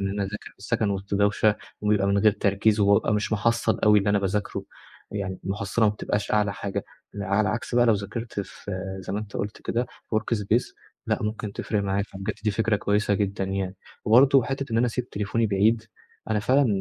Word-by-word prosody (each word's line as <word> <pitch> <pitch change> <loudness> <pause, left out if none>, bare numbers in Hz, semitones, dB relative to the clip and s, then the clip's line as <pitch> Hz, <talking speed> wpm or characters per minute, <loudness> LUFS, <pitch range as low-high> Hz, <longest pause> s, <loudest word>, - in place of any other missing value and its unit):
من 100 - -1
إن - - -3
أنا 100 - -1
أذاكر 100 +2 -6
في - - -38
السكن 105 +1 0
وسط 100 0 -3
دوشة، 105 +1 +3 0.2
ويبقى 105 -2 +2
من 100 0 +2
غير 105 0 +5
تركيز، 105 +1 +2
وبابقى 100 +1 +4
مش 105 +1 -1
محصل 115 +1 +1
أوي 105 0 +7
اللي 100 +1 +1
أنا 100 - +3
باذاكره، 100 +1 -2 0.5
يعني 95 -3 -4
المُحصلة 100 +2 0
ما 105 - +5
بتبقاش 105 0 -2
أعلى 105 -1 +2
حاجة. 100 -1 -4 0.4
ع 105 - -3
على - - +4
العكس 110 +4 -1
بقى 120 0 +5
لو 115 - +6
ذاكرت 105 +2 -4
في 100 - -9 0.3
زي 95 - -6
ما 105 - -1
أنت 105 -2 -6
قُلت 105 +1 -4
كده 120 +1 -1 0.3
الworkspace 110 +1 0 0.3
لأ - - +1
ممكن 105 -1 -3
تفرِق 105 0 -2
معايا، 100 0 0
فبجد 95 -1 -5
دي 105 - +3
فكرة 110 +1 +1
كويسة 105 0 +1
جدًا 100 -1 -1
يعني. 95 0 -3 0.3
وبرضه 130 +4 +6
حتة 135 -2 -4
إن 115 - +2
أنا 125 - +3
أسيب 125 +1 -3
تليفوني 105 +3 0
بعيد، 105 +3 +2 0.5
أنا 110 - +2
فعلًا 130 +5 +3
105 Hz, 205 wpm, -25 LUFS, 100-110 Hz, 0.5 s, أوي